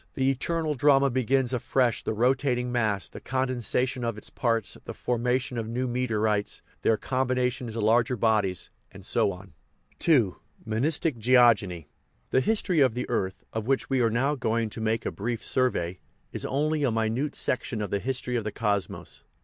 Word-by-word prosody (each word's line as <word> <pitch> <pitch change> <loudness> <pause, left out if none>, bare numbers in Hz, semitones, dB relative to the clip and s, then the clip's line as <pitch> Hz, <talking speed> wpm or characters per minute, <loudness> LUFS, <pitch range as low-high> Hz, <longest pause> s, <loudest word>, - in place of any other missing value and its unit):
The 135 0 +2
eternal 155 +3 -1
drama 140 -1 +4
begins 130 +1 +1
afresh 125 0 +1
the 110 - -3
rotat 130 +3 +2
ing 125 0 -2
mass, 110 -6 0
the - - -10
condensation 130 0 -1
of 115 -2 -2
its - - -9
parts, 115 -5 0
the - - -7
formation 125 0 -1
of 110 - -4
new 125 +3 -2
meteorites, 110 -4 0 0.2
their 110 - +3
combination 130 +1 -1
into 115 0 -4
larger 115 +3 +3
bodies, 105 -5 +1 0.2
and - - -13
so - - +2
on. 95 -2 -11 0.5
II. 120 - +4 0.3
MONISTIC 130 +4 0
GEOGENY 110 - +4 0.4
The 130 - +4
history 190 -3 +1
of 130 -5 +4
the 125 - -3
earth, 95 -5 -2
of 110 0 -3
which 135 0 0
we 130 -1 +3
are 115 - +3
now 130 +6 +1
going 115 -4 -1
to 110 - -5
make 110 +1 0
a - - -1
brief 115 +2 -3
survey, 95 -9 0 0.3
is - - -4
only 150 +2 0
a 135 - +3
minute 115 +6 -1
section 125 -2 -1
of 105 -3 -3
the 100 - +1
history 125 +1 -2
of 115 - 0
the 105 - -3
cosmos. 100 -3 -2
120 Hz, 175 wpm, -27 LUFS, 110-130 Hz, 0.5 s, drama